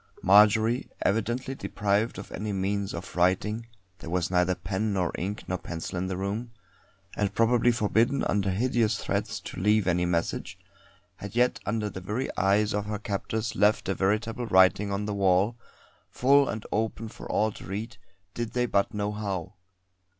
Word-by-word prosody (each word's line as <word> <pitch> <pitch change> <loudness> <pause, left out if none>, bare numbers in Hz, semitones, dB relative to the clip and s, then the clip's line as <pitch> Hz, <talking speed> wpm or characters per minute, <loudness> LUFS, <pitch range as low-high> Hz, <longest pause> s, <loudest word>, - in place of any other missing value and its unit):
Marjory, 110 +5 +5
evidently 120 +6 0
deprived 105 -3 -1
of 95 - -8
any 105 +2 -4
means 100 0 -1
of 85 +3 -7
writing 100 +6 +1 0.3
there 85 - -8
was 90 0 -1
neither 90 0 +2
pen 95 +4 -2
nor 90 -3 0
ink 100 +4 -4
nor 90 -1 -2
pencil 85 +1 -6
in 90 +1 -1
the 95 -1 -3
room 100 +5 -3 0.7
and 100 -1 -1
probably 120 +1 +4
forbidden 115 +4 +1
under 100 -1 +1
hideous 110 +1 +1
threats - - -2
to - - -7
leave 105 +1 +3
any 90 -1 +1
message, 85 -1 -2 0.6
had 100 +2 -8
yet 125 +1 +2
under 105 0 0
the 95 -2 -6
very 105 +8 -3
eyes 100 +2 +2
of 105 0 -2
her 105 0 -2
captors 110 +2 -3
left 105 +2 +3
a - - +2
veritable 110 +5 -1
writing 95 +1 +4
on 100 +1 -2
the 105 - -2
wall, 100 +3 +2 0.5
full 140 +2 +4
and 110 -1 -4
open 110 +1 -1
for - - -8
all 110 +1 +2
to - - -11
read, 110 +5 -5 0.4
did 120 -1 -4
they 125 0 +1
but 100 -3 0
know 105 0 -1
how. 100 -4 -4
105 Hz, 170 wpm, -27 LUFS, 95-110 Hz, 0.7 s, Marjory